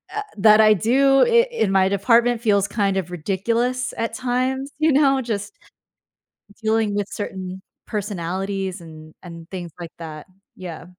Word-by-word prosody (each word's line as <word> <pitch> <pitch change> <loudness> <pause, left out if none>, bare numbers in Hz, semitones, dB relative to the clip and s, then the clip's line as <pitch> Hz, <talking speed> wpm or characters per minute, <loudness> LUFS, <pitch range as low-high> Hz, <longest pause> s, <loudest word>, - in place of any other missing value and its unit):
uh, 425 - -1 0.2
that 215 +1 +6
I 215 0 +6
do 270 +7 +3
i 470 0 +4
in 220 - 0
my 190 0 +3
department 230 +4 +2
feels 200 -3 +2
kind 200 -2 0
of 180 -2 -3
ridiculous 230 +9 -1
at 230 0 -2
times, 255 +3 -2
you 310 0 +3
know, 275 -1 +4
just 205 -3 -4 1.1
dealing 220 -1 +1
with 205 -1 -1
certain 190 -2 -6 0.3
personalities 195 -1 -3
and 155 -1 -13
and 170 -1 -11
things 175 -3 -7
like 170 -2 -7
that. 155 -1 -9 0.3
Yeah. 170 -4 -8
205 Hz, 145 wpm, -21 LUFS, 185-245 Hz, 1.1 s, that